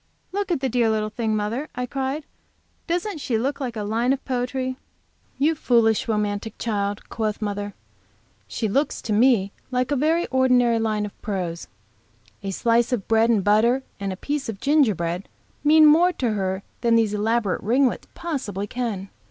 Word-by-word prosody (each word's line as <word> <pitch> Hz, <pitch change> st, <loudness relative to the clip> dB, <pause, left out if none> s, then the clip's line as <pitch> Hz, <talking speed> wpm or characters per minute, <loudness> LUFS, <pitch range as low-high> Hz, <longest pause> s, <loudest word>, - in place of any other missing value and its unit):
"Look 400 Hz, 0 st, -2 dB
at 330 Hz, -, 0 dB
the 265 Hz, -, +1 dB
dear 240 Hz, -2 st, +2 dB
little 215 Hz, -1 st, 0 dB
thing, 220 Hz, -1 st, -1 dB
mother!" 225 Hz, +8 st, -2 dB
I 250 Hz, 0 st, -2 dB
cried; 270 Hz, +3 st, -3 dB, 0.6 s
"doesn't 350 Hz, +1 st, -2 dB
she 250 Hz, -5 st, -1 dB
look 270 Hz, +6 st, -1 dB
like 250 Hz, -4 st, -4 dB
a 215 Hz, -, -3 dB
line 230 Hz, +5 st, +1 dB
of 275 Hz, -, -5 dB
poetry?" 255 Hz, 0 st, -2 dB, 0.6 s
"You 295 Hz, +4 st, +3 dB
foolish, 230 Hz, -7 st, +2 dB
romantic 210 Hz, 0 st, -2 dB
child!" 205 Hz, -3 st, -2 dB
quoth 215 Hz, -2 st, -2 dB
mother. 205 Hz, -1 st, -3 dB, 0.7 s
"She 220 Hz, -, -2 dB
looks, 275 Hz, +8 st, 0 dB
to 215 Hz, -, -1 dB
me, 215 Hz, -3 st, +4 dB, 0.2 s
like 255 Hz, +1 st, -1 dB
a -, -, +3 dB
very 320 Hz, +5 st, +2 dB
ordinary 250 Hz, -3 st, +3 dB
line 215 Hz, -2 st, 0 dB
of 205 Hz, -, -11 dB
prose. 180 Hz, -5 st, -3 dB, 0.7 s
A 195 Hz, -, -4 dB
slice 235 Hz, +5 st, +2 dB
of 235 Hz, -6 st, -1 dB
bread 225 Hz, +1 st, +3 dB
and 215 Hz, -5 st, +3 dB
butter 230 Hz, +6 st, +3 dB, 0.2 s
and 200 Hz, -1 st, -2 dB
a 185 Hz, -, -5 dB
piece 285 Hz, +3 st, -3 dB
of 205 Hz, -3 st, -5 dB
gingerbread 200 Hz, -, +1 dB, 0.3 s
mean 310 Hz, +1 st, +7 dB
more 330 Hz, +4 st, +6 dB
to 245 Hz, -7 st, -1 dB
her 190 Hz, -2 st, -2 dB, 0.2 s
than 235 Hz, -1 st, +3 dB
these 225 Hz, -2 st, +2 dB
elaborate 215 Hz, -1 st, 0 dB
ringlets 250 Hz, +5 st, +1 dB
possibly 255 Hz, -, -3 dB
can. 210 Hz, -4 st, -4 dB
230 Hz, 170 wpm, -23 LUFS, 210-265 Hz, 0.7 s, mean